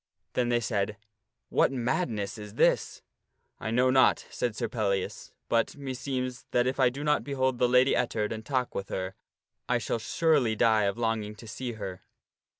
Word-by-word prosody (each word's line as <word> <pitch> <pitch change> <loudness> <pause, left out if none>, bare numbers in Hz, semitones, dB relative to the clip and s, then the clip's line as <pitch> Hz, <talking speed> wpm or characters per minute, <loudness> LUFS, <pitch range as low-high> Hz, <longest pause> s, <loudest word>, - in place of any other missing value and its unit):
Then 125 -1 +1
they 120 0 +3
said, 105 -2 -1 0.2
" 110 +3 -56
What - - +3
madness 120 - -1
is 105 0 -9
this? - - +2 0.3
" - - -47
"I - - -3
know 125 +3 +3
not," 130 0 +4
said 120 -3 -2
Sir - - -1
Pellias, 100 -5 -2
" - - -53
but, 115 +4 +1
meseems, 130 -2 -4
that 120 0 +2
if 130 +2 -1
I 130 -2 +5
do 135 +4 -6
not 150 0 +2
behold 130 -3 0
the 125 - +3
Lady 125 +2 +5
Ettard 110 -4 0
and 110 0 -6
talk 130 -1 -1
with 95 - -4
her 95 0 -3 0.6
I 125 - +3
shall 115 0 -2
surely 125 -1 +2
die 110 -2 +4
of 100 +2 -1
longing 110 -2 -1
to 110 +2 -12
see 125 +2 -5
her." 95 -4 -6
120 Hz, 190 wpm, -28 LUFS, 110-130 Hz, 0.6 s, I